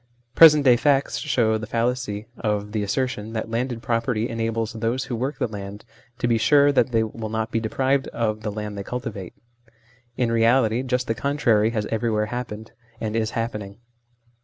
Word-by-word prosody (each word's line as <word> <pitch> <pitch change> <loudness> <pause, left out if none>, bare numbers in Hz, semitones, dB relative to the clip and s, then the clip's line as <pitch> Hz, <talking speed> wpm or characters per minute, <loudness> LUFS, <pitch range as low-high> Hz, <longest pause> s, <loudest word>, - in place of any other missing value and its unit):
Present 150 -1 +8
day 125 -2 +6
facts 140 +2 +1
show 115 -7 +1
the 110 - -6
fallacy 115 -2 -2
of 105 -2 -2
the 110 -1 -1
asser 130 +6 0
tion 110 -2 -7
that 115 0 -4
landed 120 0 -2
property 115 -2 0
enables 115 -1 -2
those 115 +3 -1
who 125 - -4
work 130 +6 -3
the - - 0
land 100 -1 -8 0.3
to 120 - -1
be 115 -1 +2
sure 145 +4 +5
that 135 -2 +2
they 115 -1 +2
will 110 0 -5
not 110 +1 -2
be 115 - +1
deprived 130 +4 0
of 110 -2 -2
the 105 -1 -3
land 105 0 -5
they 100 - -5
cultivate. 115 -6 -6 0.8
In 120 -2 +1
reality 115 0 +3
just 125 -1 -1
the 115 - 0
contrary 115 -5 +2
has 110 -3 -2
everywhere 110 -1 0
happened, 110 -3 -6 0.3
and 110 0 -3
is 110 -1 0
happening. 105 -3 -4
115 Hz, 185 wpm, -23 LUFS, 110-125 Hz, 0.8 s, Present